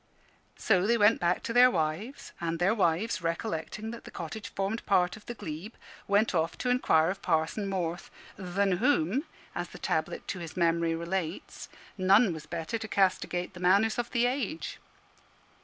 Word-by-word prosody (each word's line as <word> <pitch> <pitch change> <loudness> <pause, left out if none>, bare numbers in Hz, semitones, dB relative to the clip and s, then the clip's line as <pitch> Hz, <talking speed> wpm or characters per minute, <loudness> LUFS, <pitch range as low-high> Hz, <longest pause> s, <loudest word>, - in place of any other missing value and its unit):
So 195 -2 +2
they 235 +1 +3
went 210 +1 +5
back 175 +1 +1
to 230 - -3
their 250 +1 +8
wives; 185 - -3
and 165 -1 -1
their 180 +5 +3
wives, 185 0 +1
recollecting 170 +5 -3
that 235 - -9
the - - -10
cottage 175 +6 -6
formed 195 +4 -3
part 180 -2 +3
of 215 - -15
the 240 - -5
glebe, 180 +2 -7 0.3
went 205 +2 +3
off 165 -1 0
to 250 - 0
inquire 165 -9 +3
of 195 +1 -7
Parson 165 +4 0
Morth, 175 -2 -3 0.3
"than 190 0 0
whom," 240 - +2 0.3
as - - -4
the - - -11
tablet - - -2
to 185 - -3
his 165 -1 -8
memory 170 -1 +2
relates, 170 0 -4 0.3
"none 195 +2 +5
was 155 -2 -9
better 170 +7 -3
to 220 - -5
castigate 185 -3 0
the 180 - -10
manners 200 +6 +3
of 240 0 -2
the 240 -1 +2
age." 275 +6 -2
190 Hz, 175 wpm, -29 LUFS, 170-220 Hz, 0.3 s, their